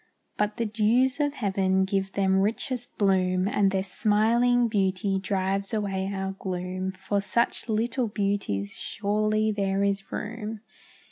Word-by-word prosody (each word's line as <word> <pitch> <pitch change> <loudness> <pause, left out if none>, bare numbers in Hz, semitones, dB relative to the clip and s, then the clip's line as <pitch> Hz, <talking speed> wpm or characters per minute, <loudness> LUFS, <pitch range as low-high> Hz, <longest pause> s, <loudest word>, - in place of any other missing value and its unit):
But 210 0 -1
the 230 - 0
dews 235 +6 +2
of 290 -1 0
heaven 190 -3 +1
give 195 0 -1
them 190 -1 +2
richest 245 +6 -2
bloom, 185 -2 +2
And 200 -1 +2
their 190 -1 0
smiling 230 +5 +2
beauty 195 -2 0
drives 195 +2 -1
away 195 -2 -1
our 190 -1 -2
gloom; 185 0 -3
For 195 +2 -2
such 235 +3 0
little 230 +3 0
beauties 200 - -1
surely 215 +1 0
there 195 -1 0
is 200 -1 -1
room. 220 0 -5
200 Hz, 135 wpm, -26 LUFS, 190-220 Hz, -, dews